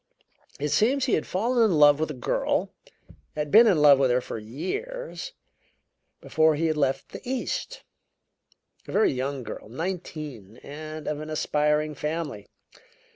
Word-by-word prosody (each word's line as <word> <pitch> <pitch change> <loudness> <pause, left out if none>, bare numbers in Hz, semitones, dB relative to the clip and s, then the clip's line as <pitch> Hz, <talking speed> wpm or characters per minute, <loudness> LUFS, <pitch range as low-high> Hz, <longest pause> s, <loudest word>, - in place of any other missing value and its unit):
It 150 +1 -1
seems 260 - +2
he 255 - 0
had - - 0
fallen 235 +5 +1
in 195 -8 +3
love 145 -1 +6
with 160 - -1
a 150 - -5
girl 125 - -1 0.6
had 150 -1 -3
been 230 +2 +8
in 185 -7 +4
love 145 -2 +7
with 135 -2 +3
her 125 +1 +3
for 120 - -6
years 465 - -5 0.9
before 160 -1 +2
he 165 +3 -1
had 160 -1 +1
left 135 -2 -1
the - - -9
East; 265 - -4 1.0
a - - -7
very 215 - +3
young 135 +1 -3
girl, 110 - -8
nineteen, 150 - -6
and 155 +1 -8
of 150 -1 -2
an 155 - -7
aspiring 150 0 0
family. 150 -7 -4
155 Hz, 155 wpm, -26 LUFS, 140-185 Hz, 1.0 s, been